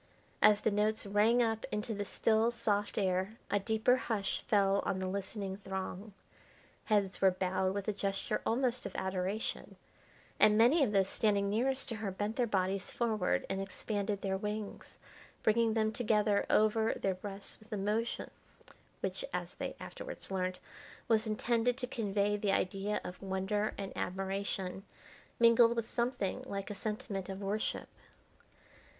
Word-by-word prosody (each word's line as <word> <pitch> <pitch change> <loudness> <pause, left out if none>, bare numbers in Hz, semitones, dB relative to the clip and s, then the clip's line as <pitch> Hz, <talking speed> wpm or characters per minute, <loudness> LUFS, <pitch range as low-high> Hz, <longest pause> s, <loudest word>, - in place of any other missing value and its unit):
As 210 -1 +6
the 220 - +2
notes 210 +2 +2
rang 215 +4 +4
up 225 -1 -1
into 210 +2 -2
the 205 -1 -3
still, 220 +3 +2
soft 210 -3 -1
air 190 +2 0
a 205 - +3
deeper 220 +5 +2
hush 215 -6 -1
fell 200 -1 +3
on 195 - -1
the 190 - -2
listening 195 0 -3
throng. 195 +1 -5 0.7
Heads 200 -3 +1
were 190 - +7
bowed 185 +1 0
with 200 -1 -3
a 215 - +1
gesture 195 -1 -1
almost 245 +1 +1
of - - -11
adoration, 190 +3 -2 0.6
and 210 0 +6
many 260 +8 +6
of 235 - +1
those 195 -2 +3
standing 200 -1 +2
nearest 265 +5 +1
to 230 - -3
her 215 -2 -3
bent 205 +3 -3
their 245 -2 +1
bodies 190 -2 0
forward, 220 -6 0
and 195 - -2
expanded 200 +1 -3
their 190 -1 0
wings, 210 +1 -5 0.5
bringing 225 0 +3
them 220 -1 +2
together 210 -3 +2
over 220 +1 +3
their 195 - 0
breasts 195 +1 -7
with 215 +1 -20
a 210 - -1
motion 210 +4 -1 0.7
which, - - -2
as - - -3
they - - -5
afterwards - - -8
learnt, 185 -1 -1 0.5
was 220 0 +3
intended 235 +3 +1
to 255 - -2
convey 205 -4 0
the 205 -1 0
idea 195 +2 0
of 180 - -8
wonder 195 +2 -1
and 195 -1 -5
admiration, 190 0 -3 0.6
mingled 235 0 +6
with 230 -1 -2
something 240 -2 -1
like 200 -1 -4
a - - -2
sentiment 200 -2 -4
of 190 0 -5
worship. 210 +3 -1
205 Hz, 155 wpm, -33 LUFS, 195-225 Hz, 0.7 s, were